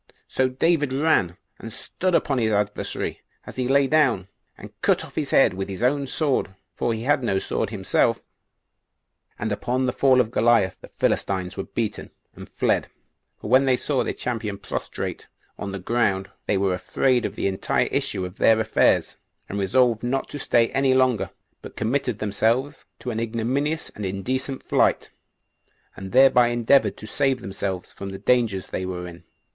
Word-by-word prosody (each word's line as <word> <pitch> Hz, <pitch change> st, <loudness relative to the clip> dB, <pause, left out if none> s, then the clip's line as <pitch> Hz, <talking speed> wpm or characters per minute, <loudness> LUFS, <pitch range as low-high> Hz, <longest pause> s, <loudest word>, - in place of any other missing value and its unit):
So 130 Hz, 0 st, +1 dB
David 145 Hz, +2 st, +1 dB
ran, 130 Hz, -, +2 dB, 0.2 s
and 115 Hz, -, -8 dB
stood 185 Hz, -, -1 dB
upon 135 Hz, -4 st, +1 dB
his 110 Hz, -2 st, +1 dB
adversary 105 Hz, 0 st, -2 dB, 0.2 s
as -, -, -10 dB
he 125 Hz, -1 st, 0 dB
lay 140 Hz, +1 st, +4 dB
down, 130 Hz, -10 st, +2 dB, 0.3 s
and -, -, -11 dB
cut -, -, +2 dB
off -, -, -15 dB
his -, -, -2 dB
head -, -, +4 dB
with 95 Hz, +1 st, -4 dB
his 95 Hz, +4 st, -5 dB
own 140 Hz, +2 st, +1 dB
sword; 135 Hz, -9 st, -1 dB, 0.2 s
for -, -, -1 dB
he 110 Hz, 0 st, -3 dB
had 145 Hz, +1 st, +2 dB
no 95 Hz, -5 st, +1 dB
sword 100 Hz, +2 st, -1 dB
himself. 110 Hz, +2 st, +1 dB, 1.2 s
And -, -, -3 dB
upon 130 Hz, +1 st, -1 dB
the 125 Hz, -, 0 dB
fall 130 Hz, -2 st, +4 dB
of 115 Hz, -3 st, +1 dB
Goliath 115 Hz, -6 st, +3 dB
the -, -, -11 dB
Philistines 95 Hz, -1 st, -1 dB
were 95 Hz, -, -4 dB
beaten, 115 Hz, -3 st, -4 dB, 0.3 s
and -, -, -11 dB
fled; -, -, 0 dB, 0.5 s
for -, -, -7 dB
when 130 Hz, +2 st, +6 dB
they 130 Hz, -2 st, +3 dB
saw 135 Hz, -1 st, 0 dB
their -, -, -3 dB
champion 110 Hz, -5 st, -3 dB
prostrate -, -, -5 dB, 0.3 s
on 100 Hz, -, -4 dB
the 100 Hz, -, -4 dB
ground, 95 Hz, -1 st, 0 dB, 0.2 s
they 100 Hz, -, +2 dB
were 95 Hz, -1 st, +1 dB
afraid 120 Hz, +7 st, +1 dB
of -, -, -3 dB
the -, -, -3 dB
entire 95 Hz, -1 st, +1 dB
issue 95 Hz, -, -1 dB
of 90 Hz, +2 st, -10 dB
their 110 Hz, -1 st, +5 dB
affairs, 110 Hz, 0 st, +2 dB, 0.3 s
and 100 Hz, -, -4 dB
resolved 115 Hz, +3 st, +2 dB
not 130 Hz, +2 st, -1 dB
to 145 Hz, -, -6 dB
stay 115 Hz, -4 st, +2 dB
any 135 Hz, -1 st, +2 dB
longer, 130 Hz, -5 st, +2 dB, 0.3 s
but -, -, -11 dB
committed 125 Hz, 0 st, -1 dB
themselves 115 Hz, +7 st, 0 dB
to 125 Hz, -, -5 dB
an 110 Hz, -, -3 dB
ignominious 125 Hz, +8 st, -1 dB
and 105 Hz, -, -8 dB
indecent 130 Hz, +8 st, -3 dB
flight, -, -, +1 dB, 0.8 s
and 95 Hz, 0 st, -8 dB
thereby 130 Hz, -2 st, +6 dB
endeavored 120 Hz, -1 st, +3 dB
to -, -, -9 dB
save 135 Hz, +3 st, 0 dB
themselves 95 Hz, -2 st, -4 dB
from 100 Hz, -, -7 dB
the 95 Hz, -, -6 dB
dangers 115 Hz, -5 st, +1 dB
they 95 Hz, -, -4 dB
were 90 Hz, -1 st, -4 dB
in. 85 Hz, -1 st, -11 dB
115 Hz, 175 wpm, -24 LUFS, 100-130 Hz, 1.2 s, when